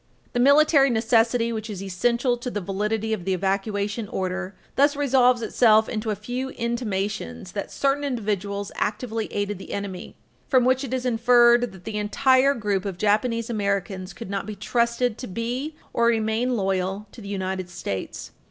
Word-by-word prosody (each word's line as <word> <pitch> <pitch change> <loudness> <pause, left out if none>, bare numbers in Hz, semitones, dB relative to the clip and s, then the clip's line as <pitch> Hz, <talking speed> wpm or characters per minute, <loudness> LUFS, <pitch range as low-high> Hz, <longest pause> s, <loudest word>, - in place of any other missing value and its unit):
[Footnote - - -36
3/13] - - -41
The 245 - 0
military 280 +1 +5
necessity 230 0 +2
which 220 0 -5
is 195 -2 -5
essential 235 +7 +1
to 245 +1 -5
the 210 - -3
validity 210 +3 -1
of 200 -5 -3
the 190 +1 0
evacuation 205 +3 -1
order 185 0 -3 0.2
thus 285 +2 +4
resolves 255 -4 +3
itself 220 -2 +4
into 220 -1 -3
a 210 - 0
few 245 +6 -4
intimations 205 - -3
that - - -5
certain 280 +1 0
individuals 205 -6 -2
actively 220 +1 -2
aided 205 -1 -2
the - - -8
enemy, 200 -2 -5 0.3
from 255 -3 +4
which 260 +2 +2
it 265 - -5
is 255 -1 -2
inferred 240 0 +4
that 190 -2 -14
the 210 +1 -3
entire 260 +6 +3
group 205 -4 -1
of 195 -3 -4
Japanese 220 +3 +1
Americans 200 -3 -2
could 185 - -8
not 195 0 -3
be 215 - -5
trusted 235 +1 0
to 255 - -5
be 245 +9 -3 0.2
or 235 - +3
remain 230 +2 +1
loyal 190 +1 -1
to 235 - -12
the 200 - -9
United 190 -2 -3
States. 100 - -5
220 Hz, 175 wpm, -24 LUFS, 200-245 Hz, 0.3 s, military